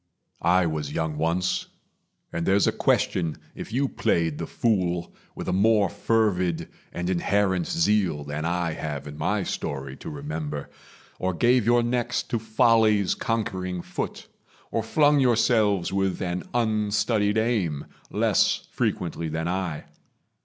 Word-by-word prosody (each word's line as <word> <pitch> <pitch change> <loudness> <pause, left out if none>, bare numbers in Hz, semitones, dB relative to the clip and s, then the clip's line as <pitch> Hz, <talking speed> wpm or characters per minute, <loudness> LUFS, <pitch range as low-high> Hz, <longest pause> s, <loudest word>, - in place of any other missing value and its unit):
I 90 +2 +4
was 75 -3 -2
young 80 0 -2
once; 85 +3 0 0.7
And 85 - -2
there's 100 +1 +4
a - - +3
question 85 -4 +1 0.2
if - - -8
you 135 +4 +1
played 80 - 0
the - - -3
fool 90 -6 0 0.2
With - - -6
a - - 0
more 105 +1 +4
fervid 100 -5 0 0.2
and 90 0 -3
inherent 100 - +1
zeal 105 - +1
Than 75 +2 -4
I 85 0 0
have 75 -3 -5
in 75 0 -8
my - - 0
story 70 -1 -4
to - - -8
remember, 75 0 -5 0.5
Or 95 -1 -1
gave 120 +3 +3
your 120 0 +4
necks 120 0 0
to 115 - -2
folly's 110 -2 +3
conquering 95 -6 -2
foot, - - -5 0.5
Or 115 - 0
flung 145 +6 +3
yourselves 110 -7 +3
with 95 -1 0
an 90 0 -3
unstudied 105 -2 +1
aim, 105 -11 0 0.2
Less - - +2
frequently 80 -1 -2
than 80 +2 -2
I. 90 -4 -2
95 Hz, 140 wpm, -25 LUFS, 80-110 Hz, 0.7 s, I